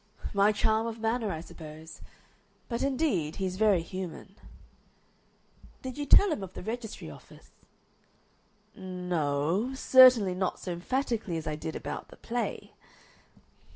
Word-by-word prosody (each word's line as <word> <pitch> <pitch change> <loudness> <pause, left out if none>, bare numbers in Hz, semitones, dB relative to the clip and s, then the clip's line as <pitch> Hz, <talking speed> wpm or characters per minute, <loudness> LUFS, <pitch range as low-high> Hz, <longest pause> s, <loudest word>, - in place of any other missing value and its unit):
"My 200 +1 +4
charm 220 +2 +1
of 230 0 -5
manner, 225 -1 0
I 160 - -4
suppose. 160 -1 -11 0.7
But, 235 -1 -3
indeed, 255 - 0
he's 185 -1 -3
very 205 -5 +3
human." 185 +2 -7 1.5
"Did 260 -1 -5
you 290 -1 -4
tell 400 +6 +7
him 305 - -2
of 190 -1 -8
the - - -7
registry 225 +1 -6
office?" - - -16 1.2
"No 180 - -1
o 265 - -5
certainly 255 -7 +7
not 185 0 -1
so 180 - -5
emphatically 220 0 -2
as 160 - -5
I 155 - -2
did 160 +1 -6
about - - -5
the - - -15
play." 240 0 -4
200 Hz, 135 wpm, -29 LUFS, 175-235 Hz, 1.5 s, tell